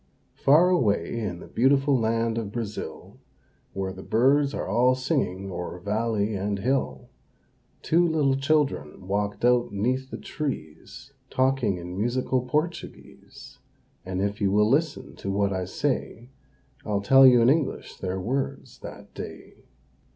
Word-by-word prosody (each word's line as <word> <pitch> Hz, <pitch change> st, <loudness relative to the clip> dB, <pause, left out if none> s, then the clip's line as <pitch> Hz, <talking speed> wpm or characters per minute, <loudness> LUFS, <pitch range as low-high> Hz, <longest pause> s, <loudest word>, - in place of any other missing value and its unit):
Far 160 Hz, +6 st, +5 dB
away 115 Hz, -, +1 dB
in 95 Hz, -6 st, -4 dB
the -, -, -11 dB
beautiful 135 Hz, +3 st, +3 dB
land 115 Hz, -1 st, 0 dB
of 105 Hz, -3 st, -5 dB
Brazil, 110 Hz, -2 st, -6 dB, 0.5 s
Where 95 Hz, -1 st, -3 dB
the 95 Hz, -, -10 dB
birds 135 Hz, +7 st, +2 dB
are -, -, -3 dB
all 125 Hz, +3 st, +3 dB
singing 130 Hz, -, -2 dB
o'er 90 Hz, 0 st, -5 dB
valley 105 Hz, +2 st, -1 dB
and 100 Hz, +1 st, -2 dB
hill, 130 Hz, +7 st, -2 dB, 0.7 s
Two 170 Hz, +2 st, +3 dB
little 150 Hz, -4 st, +2 dB
children 135 Hz, -, -1 dB
walked 100 Hz, +2 st, -1 dB
out 125 Hz, -2 st, +3 dB
'neath 125 Hz, +6 st, -1 dB
the -, -, -6 dB
trees, 130 Hz, -, -6 dB, 0.2 s
Talking 130 Hz, -7 st, +1 dB
in 90 Hz, +1 st, -7 dB
musical 125 Hz, +3 st, 0 dB
Portuguese; 155 Hz, +7 st, -5 dB, 0.4 s
And 95 Hz, +1 st, -3 dB
if 100 Hz, +1 st, -3 dB
you 100 Hz, -1 st, +2 dB
will 105 Hz, +1 st, +4 dB
listen 145 Hz, +5 st, 0 dB
to 100 Hz, -, -5 dB
what 100 Hz, 0 st, +1 dB
I 95 Hz, -1 st, -2 dB
say, 125 Hz, +2 st, -3 dB, 0.5 s
I'll 100 Hz, -1 st, -1 dB
tell 135 Hz, +6 st, +7 dB
you 125 Hz, -1 st, +6 dB
in 120 Hz, -, +5 dB
English 155 Hz, -2 st, -2 dB
their 95 Hz, 0 st, -3 dB
words 130 Hz, +8 st, -3 dB
that -, -, -11 dB
day. -, -, -10 dB
115 Hz, 145 wpm, -25 LUFS, 100-135 Hz, 0.7 s, tell